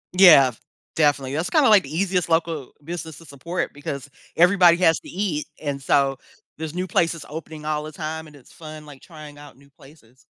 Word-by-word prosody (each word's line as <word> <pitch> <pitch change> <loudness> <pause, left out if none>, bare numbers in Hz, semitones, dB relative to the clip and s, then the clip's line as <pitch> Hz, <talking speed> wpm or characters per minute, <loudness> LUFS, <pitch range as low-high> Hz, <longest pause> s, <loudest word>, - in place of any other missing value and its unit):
Yeah, 160 -9 +7 0.4
definitely. 145 -4 +1
That's 160 +3 -2
kinda, 300 -7 +4
like, 210 -3 +6
the 140 - -10
easiest 180 -1 0
local 165 -4 -1
business 165 -1 -7
to 165 - -14
support 165 +5 -5
because 140 -1 -7 0.3
everybody 175 -1 +5
has 165 -3 +3
to - - -13
eat, 180 -6 -3
and 140 -2 -4
so, 135 0 +1 0.4
there's 160 0 -6
new 180 +1 -2
places 165 -2 -1
opening 155 0 -9
all 150 -1 -1
the 155 +1 -8
time 160 +1 -6
and 150 - -16
it's 135 -4 -18
fun, 155 -1 -11
like, 145 -3 -14
trying 150 -3 -13
out 145 -2 -14
new 140 +1 -22
places. 135 -3 -21
155 Hz, 190 wpm, -22 LUFS, 145-170 Hz, 0.4 s, Yeah